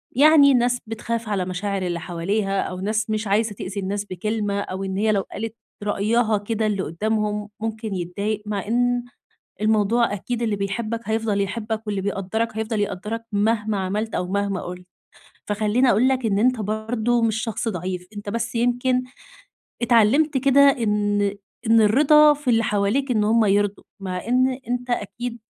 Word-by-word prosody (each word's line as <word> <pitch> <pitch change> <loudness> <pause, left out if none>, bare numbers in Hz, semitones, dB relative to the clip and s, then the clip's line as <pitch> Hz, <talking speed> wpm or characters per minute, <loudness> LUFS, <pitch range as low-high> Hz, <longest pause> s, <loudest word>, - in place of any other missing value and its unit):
يعني، 285 -1 +7
ناس 245 0 +2
بتخاف 230 0 -4
على 190 -3 0
مشاعر 195 +2 -3
اللي 175 -2 -2
حواليها، 195 +4 -1
أو 185 0 -5
ناس 215 +3 -1
مش 215 -1 -1
عايزة 210 +1 +1
تؤذي 195 +2 -5
الناس 200 +2 -3
بكلمة، 205 +2 -2
أو 190 -1 -4
إن 190 0 -3
هي 215 +1 +2
لو 200 -2 +2
قالت 225 +1 -5 0.3
رأيها 215 +2 +1
كده 220 +2 -2
اللي 195 -3 -1
قدّامهم 210 +3 -2
ممكن 220 -2 -3
يتضايق. 200 +4 -3
مع 205 -1 -3
إن 245 +1 +1 0.6
الموضوع 215 +1 +2
أكيد، 235 +4 -3
اللي 215 -3 0
بيحبك 215 +3 -3
هيفضل 220 -2 0
يحبك، 220 +2 -3
واللي 200 -2 -2
بيقدّرك 205 +3 -2
هيفضل 220 -1 -1
يقدّرك، 210 +3 -3
مهما 210 0 +1
عملت 205 +4 -2
أو 180 - -1
مهما 200 -1 -1
قلت. 180 0 -8 0.6
فخليني 215 +5 +2
أقول 240 +6 +4
لك 260 -3 0
إن 200 -2 +1
أنت 250 0 +2
برضو 220 +3 0
مش 220 -1 +1
شخص 225 0 -2
ضعيف، 180 -1 -4
أنت 205 0 -7
بس 230 +1 -3
يمكن 245 +2 +1 0.8
اتعلمت 255 +6 +4
كده، 275 +1 +4
إن 210 -6 +2 0.3
إن 225 0 +5
الرضا 295 +7 +6
في 285 -3 -2
اللي 230 0 +3
حواليك، 210 +7 0
إن 215 -3 +2
هُم 225 +1 +3
يرضوا، 205 0 +1 0.2
مع 185 +1 -4
إن 255 +1 +2
أنت 245 0 -2
أكيد 240 +2 -3
215 Hz, 160 wpm, -23 LUFS, 200-235 Hz, 0.8 s, يعني